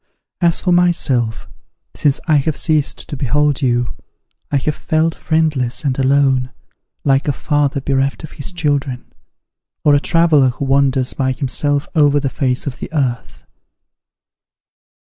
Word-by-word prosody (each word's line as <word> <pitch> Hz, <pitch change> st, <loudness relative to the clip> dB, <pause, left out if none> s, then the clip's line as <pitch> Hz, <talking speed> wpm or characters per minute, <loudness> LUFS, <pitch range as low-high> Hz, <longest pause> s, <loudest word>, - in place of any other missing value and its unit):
As 170 Hz, -1 st, +3 dB
for 180 Hz, -, 0 dB
myself, 140 Hz, -10 st, +1 dB, 0.5 s
since 145 Hz, -2 st, +1 dB
I 155 Hz, -2 st, +4 dB
have 145 Hz, +2 st, -1 dB
ceased 155 Hz, -3 st, -1 dB
to -, -, -4 dB
behold 145 Hz, +2 st, 0 dB
you, 120 Hz, -2 st, 0 dB, 0.6 s
I 145 Hz, -, +2 dB
have 150 Hz, +3 st, -1 dB
felt 160 Hz, +1 st, 0 dB
friendless 155 Hz, -8 st, -1 dB
and 140 Hz, -2 st, -1 dB
alone, 135 Hz, -1 st, +2 dB, 0.5 s
like 135 Hz, 0 st, +2 dB
a -, -, +3 dB
father 145 Hz, 0 st, 0 dB
bereft 135 Hz, +2 st, -1 dB
of 155 Hz, -, -9 dB
his 145 Hz, -, -7 dB
children, 145 Hz, -7 st, -2 dB, 0.8 s
or 145 Hz, -, +6 dB
a 145 Hz, -, +5 dB
traveller 155 Hz, -4 st, +3 dB
who 130 Hz, +3 st, -4 dB
wanders 135 Hz, -1 st, +2 dB
by 130 Hz, -1 st, -1 dB
himself 145 Hz, +2 st, -1 dB
over 145 Hz, -2 st, +4 dB
the 135 Hz, -2 st, -2 dB
face 125 Hz, -1 st, -1 dB
of 135 Hz, -4 st, -5 dB
the -, -, -7 dB
earth. 120 Hz, -, -3 dB
140 Hz, 140 wpm, -17 LUFS, 130-150 Hz, 0.8 s, or